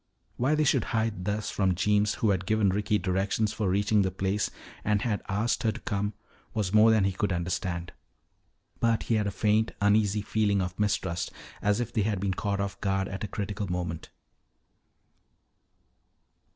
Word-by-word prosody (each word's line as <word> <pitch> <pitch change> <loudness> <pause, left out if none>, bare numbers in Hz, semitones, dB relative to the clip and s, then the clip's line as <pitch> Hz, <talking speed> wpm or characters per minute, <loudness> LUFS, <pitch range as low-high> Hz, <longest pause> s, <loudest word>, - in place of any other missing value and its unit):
Why 135 +5 +2
they 155 - +2
should 145 - +2
hide 110 -5 -1
thus 105 +1 -1
from 95 -3 +1
Jeems 105 +3 +2
who 110 - +2
had 95 -1 -1
given 110 -2 +3
Ricky 105 +2 +1
directions 100 +3 0
for 105 -4 -1
reaching 100 +2 +3
the 95 - +1
place 95 +2 -1 0.3
and 105 -1 +1
had 110 -4 -1
asked 105 +4 0
her 110 - +2
to - - -8
come, 100 0 -2 0.4
was 105 -3 -1
more 110 +1 +7
than 110 -3 +4
he 95 - +2
could 95 +2 -1
understand. 85 0 -2 0.9
But 115 -1 +2
he - - -1
had 105 -2 +2
a - - -1
faint, 105 +3 +1
uneasy 105 0 +3
feeling 105 -2 +1
of 90 0 -3
mistrust, 95 -4 0 0.3
as 105 +1 +2
if 120 -1 -3
they 110 - +1
had 105 -1 0
been 95 0 0
caught 100 +1 -2
off 100 0 -3
guard 95 -1 0
at 95 +2 -5
a - - -1
critical 100 0 -4
moment. 85 -2 -3
100 Hz, 180 wpm, -28 LUFS, 95-105 Hz, 0.9 s, more